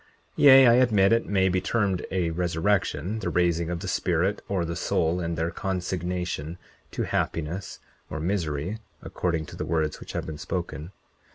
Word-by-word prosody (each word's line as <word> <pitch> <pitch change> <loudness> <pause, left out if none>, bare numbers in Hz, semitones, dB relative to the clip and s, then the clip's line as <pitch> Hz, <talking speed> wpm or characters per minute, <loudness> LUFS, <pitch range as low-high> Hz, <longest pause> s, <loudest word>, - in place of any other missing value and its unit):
Yea, 135 -2 +8
I 120 - +7
admit 115 -5 +4
it 115 - +1
may 95 -2 +2
be 95 0 +1
termed 100 -5 0
a 90 -3 0
resurrection, 90 +2 0
the - - -2
raising 85 -1 +1
of 85 -1 -3
the - - -5
spirit 90 +1 0
or 95 -4 0
the 85 0 -4
soul 85 0 0
and 85 -1 -3
their 80 +1 -1
consignation 90 -3 -3 0.3
to - - -3
happiness 85 +5 -2 0.3
or 80 - -4
misery, 85 +2 -2 0.2
according 85 -3 -2
to - - -11
the - - -4
words 80 -2 -1
which - - -9
have - - -3
been 75 -2 -7
spoken. 85 -2 -4
90 Hz, 170 wpm, -26 LUFS, 80-95 Hz, 0.3 s, Yea